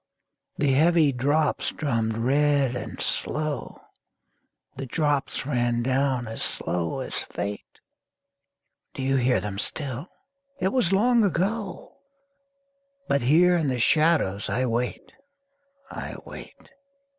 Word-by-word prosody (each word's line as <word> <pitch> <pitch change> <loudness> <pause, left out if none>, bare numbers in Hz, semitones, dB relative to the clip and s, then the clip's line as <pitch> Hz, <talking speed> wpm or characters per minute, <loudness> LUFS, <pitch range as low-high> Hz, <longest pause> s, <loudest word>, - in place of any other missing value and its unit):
The 145 -1 +2
heavy 160 +1 +4
drops 145 +4 +1
drummed 115 -7 -1
red 140 +1 +2
and 125 - -6
slow, 155 -2 -2 0.9
The 135 0 -6
drops 145 0 0
ran 120 -3 0
down 130 -1 0
as 110 - -5
slow 85 -1 -1
as - - -3
fate 100 0 -6 1.2
Do 135 - -4
ye 135 +1 +2
hear 125 -3 +3
them 100 0 -5
still? 140 +5 -3 0.5
it 190 - +1
was 235 -6 +1
long 230 +4 +4
ago! 200 +2 -2 1.1
But 140 - +2
here 170 +8 +5
in 165 -4 +1
the 130 -2 -1
shadows 150 - +2
I 130 +1 0
wait, 120 +1 -2 0.8
I - - -6
wait! - - -12
135 Hz, 115 wpm, -25 LUFS, 120-155 Hz, 1.2 s, here